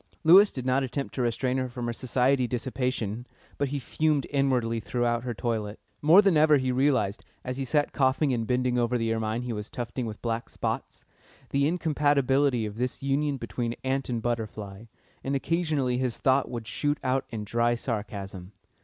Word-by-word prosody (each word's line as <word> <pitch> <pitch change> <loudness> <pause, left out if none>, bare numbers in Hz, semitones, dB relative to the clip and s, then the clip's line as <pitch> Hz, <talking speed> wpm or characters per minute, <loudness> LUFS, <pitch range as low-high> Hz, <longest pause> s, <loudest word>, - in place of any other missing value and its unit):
Lewis 190 +6 +8
did 130 -2 -5
not 130 +1 +2
attempt 135 +1 -3
to 130 - -2
restrain 125 +2 0
her 130 -1 -1
from 120 0 -5
her 120 - -2
society 130 +1 +1
dissipation, 125 -2 -2 0.3
but 140 - +1
he 145 +2 -3
fumed 150 +2 0
inwardly 125 -5 +1
throughout 120 +1 0
her 120 -1 -4
toilette. 110 -2 -2 0.2
More 170 +7 +7
than 195 -4 +4
ever 150 -1 +6
he 130 -1 0
realised, 130 -6 +1 0.2
as 125 0 -4
he 135 - -2
sat 145 +2 +1
coughing 135 +1 +2
and 115 -2 -2
bending 125 -1 +1
over 120 +1 +1
the 115 -1 0
ermine 110 +1 -2
he 125 -1 -3
was 105 -1 -6
tufting 120 0 -4
with 105 -1 -7
black 115 0 -2
spots, - - -4 0.5
the 140 +1 +2
incompatibility 145 -6 +2
of 105 0 -6
this 125 +2 -3
union 140 +1 0
between 120 0 -3
ant 135 0 -1
and 115 -2 -2
butterfly, 110 -3 -4 0.4
and 135 +1 -1
occasionally 145 -5 0
his 125 -3 -1
thought 135 0 +2
would 120 -2 -5
shoot 145 +6 -1
out 130 +1 0
in 110 -2 -5
dry 120 +3 +1
sarcasm. 100 -5 -5
125 Hz, 180 wpm, -27 LUFS, 115-140 Hz, 0.5 s, Lewis